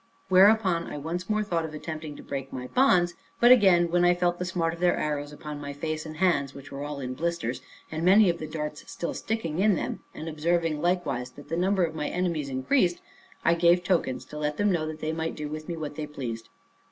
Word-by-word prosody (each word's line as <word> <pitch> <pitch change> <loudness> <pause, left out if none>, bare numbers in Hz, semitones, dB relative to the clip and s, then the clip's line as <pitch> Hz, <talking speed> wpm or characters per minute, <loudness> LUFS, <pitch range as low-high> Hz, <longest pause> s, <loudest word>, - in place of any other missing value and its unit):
Whereupon 190 -2 +5
I - - -6
once 170 +6 -4
more 215 0 +1
thought 170 -5 -1
of 155 -1 -6
attempting 155 -1 -6
to - - -11
break 135 -1 -5
my 125 -1 -5
bonds; 180 - +3 0.3
but 240 +1 +7
again, 185 -8 +6
when 175 0 +3
I 175 0 +5
felt 175 0 0
the 180 - -2
smart 170 -2 -1
of 170 - -9
their 180 0 +3
arrows, 145 -1 -2
upon 150 0 -7
my 140 0 -5
face 155 +2 -4
and 155 0 -8
hands, 140 -7 +1
which 140 +1 -11
were 140 +1 -5
all 145 -1 -5
in 130 -1 -4
blisters, 160 -5 -2 0.3
and 160 +1 -3
many 195 +4 +6
of 170 -1 +1
the 155 - -5
darts 150 -1 -5
still 170 - -3
sticking 185 -8 -3
in 205 0 +4
them; - - -3 0.2
and 160 - -6
observing 160 0 0
likewise 155 -8 0
that 145 +1 -13
the 165 - -1
number 185 +2 +2
of 165 -2 -1
my 150 -2 -3
enemies 170 -6 -1
increased, 175 - +1 0.5
I 170 - +5
gave 170 +1 +4
tokens, 145 -9 0
to 150 - -8
let 150 0 -1
them 205 0 +2
know 160 -3 0
that 155 0 -7
they 155 +1 -1
might 160 0 -3
do 150 - -4
with 155 +2 -7
me 170 - -3
what 150 -2 -5
they 150 0 -4
pleased. 120 -6 -6
160 Hz, 235 wpm, -27 LUFS, 150-175 Hz, 0.5 s, but